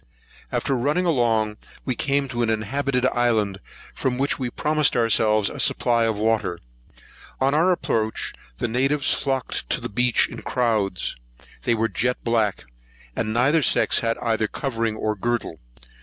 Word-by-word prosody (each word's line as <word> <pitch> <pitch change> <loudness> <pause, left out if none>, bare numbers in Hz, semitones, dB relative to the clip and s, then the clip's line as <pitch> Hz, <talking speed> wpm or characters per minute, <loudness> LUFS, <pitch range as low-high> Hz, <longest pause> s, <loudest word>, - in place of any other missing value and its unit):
After 135 - 0
running 145 +9 0
along, 115 -8 +1 0.3
we 130 - 0
came 140 +3 0
to 120 -2 -2
an 115 - +1
inhabited 125 +4 -1
island, 110 -6 +1 0.3
from 125 -1 -1
which 140 +2 0
we 125 -2 -2
promised 150 +3 +1
ourselves 110 -2 +3
a - - -6
supply 115 -1 +3
of 110 -2 0
water. 110 -5 0 0.8
On 135 +1 +2
our 165 +5 +3
approach, 110 -10 -1 0.2
the - - -1
natives 135 +4 +2
flocked 135 - -2
down - - +2
to - - -7
the - - -4
beach 125 +1 +3
in - - -9
crowds. 110 -7 -1 0.5
They 120 - +3
were 115 0 +1
jet 125 +2 0
black, 110 -4 0 0.5
and 110 -1 -2
neither 135 +8 +3
sex - - +4
had 115 0 -1
either 110 -2 +1
covering 115 -3 -2
or 110 0 -1
girdle. 115 -6 -2
120 Hz, 155 wpm, -23 LUFS, 110-135 Hz, 0.8 s, sex